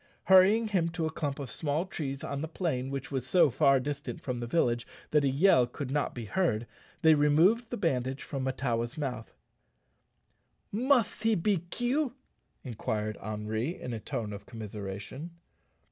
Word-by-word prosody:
Hurrying 200 +4 +6
him 175 -5 +1
to 165 - 0
a 160 - -1
clump 145 -3 -3
of 140 -5 -6
small 155 +2 -1
trees 140 -7 -5
on 140 0 -3
the 160 - -2
plain 155 -6 -2
which 135 0 -5
was 135 -3 -1
so 170 -2 +5
far 135 +2 +4
distant 140 +2 -4
from 125 -2 -4
the 120 - -4
village 120 -5 +1 0.2
that 150 -1 +4
a 140 - +3
yell 135 -3 +5
could 130 +1 -6
not 145 0 -1
be 120 -2 -5
heard, 120 - 0 0.4
they 160 -1 +8
removed 165 +11 +4
the 240 - -3
bandage 135 -7 -1
from 135 -3 -4
Mahtawa's 125 -1 -1
mouth. 125 -6 -4 1.4
"Must 245 0 +2
he 225 0 +3
be 180 -1 0
kill?" 250 +3 0 0.5
inquired 110 -3 -3
Henri, 110 - -3
in 125 - -5
a 115 - -3
tone 105 0 -4
of 100 0 -9
commiseration. 105 - -6
140 Hz, 165 wpm, -30 LUFS, 120-175 Hz, 1.4 s, they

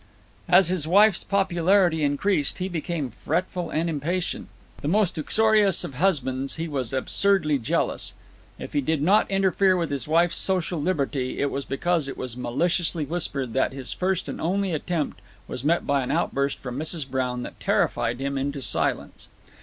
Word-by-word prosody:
As 185 -3 +6
his 175 -4 0
wife's 205 +2 +5
popularity 180 -3 +2
increased, 145 +2 +1
he 185 - -2
became 165 -6 -3
fretful 175 +8 -2
and 165 +2 -1
impatient. 165 +3 -2 0.3
The - - -3
most 200 +2 +2
uxorious 215 +2 +3
of - - -6
husbands, 135 -4 0
he 165 +1 -3
was 135 -6 -3
absurdly 155 +2 +1
jealous. 115 - -1 0.4
If - - -8
he 145 - +2
did 150 +1 0
not 200 +6 +4
interfere 195 -1 +3
with 170 -3 -2
his 140 0 -3
wife's 170 +2 +2
social 180 -4 +1
liberty, 140 -6 -1
it 140 - 0
was 140 -1 -3
because 165 +2 0
it 135 - -6
was 125 -2 -5
maliciously 165 +5 -1
whispered 140 -6 -3
that 130 0 +1
his 135 -2 -5
first 185 -1 -1
and - - -5
only 190 +2 0
attempt 160 0 -2 0.3
was 125 - -5
met 165 +4 +2
by 140 -1 +2
an 125 - -4
outburst 140 -2 0
from 125 0 -6
Mrs. 155 -2 -2
Brown 125 -2 -2
that - - -9
terrified 120 - 0
him 140 0 -2
into 140 +1 -2
silence. - - -2
160 Hz, 170 wpm, -25 LUFS, 140-180 Hz, 0.4 s, As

